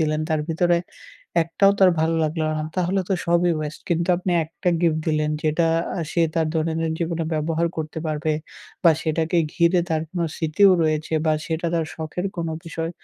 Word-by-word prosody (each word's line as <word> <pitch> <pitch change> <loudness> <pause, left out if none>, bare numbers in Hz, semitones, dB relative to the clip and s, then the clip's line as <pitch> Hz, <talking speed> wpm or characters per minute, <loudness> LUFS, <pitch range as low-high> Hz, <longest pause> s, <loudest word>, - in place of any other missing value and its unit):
দিলেন 155 -1 +1
তার 155 -1 +1
ভিতরে 175 +2 +2 0.7
একটাও 195 +4 +3
তার 185 -1 +7
ভালো 160 +1 +2
লাগলো 155 +1 -1
না 155 - -2
তাহলে 185 +2 +1
তো - - +1
সবই 175 +1 +3
ওয়েস্ট। 150 0 -5
কিন্তু 170 +1 +1
আপনি 180 0 -2
একটা 165 +3 -4
গিফট 165 -2 +2
দিলেন 155 -1 +1
যেটা 155 +2 +2 0.3
আ - - -1
সে 170 - +1
তার 160 -1 +1
দৈনন্দিন 160 0 0
জীবনে 165 -1 -1
ব্যবহার 160 +2 0
করতে 160 0 -4
পারবে 155 0 -1 0.5
বা 165 - +8
সেটাকে 160 +2 0 0.2
ঘিরে 175 0 +3
তার 160 -1 +1
কোনো 175 -2 -1
স্মৃতিও 170 +5 +4
রয়েছে 155 0 -1
বা 155 - +4
সেটা 165 +1 -2
তার 165 -1 +1
শখের 160 +4 -4
কোনো 165 -1 -2
বিষয়। 165 0 -4
165 Hz, 180 wpm, -23 LUFS, 155-170 Hz, 0.7 s, বা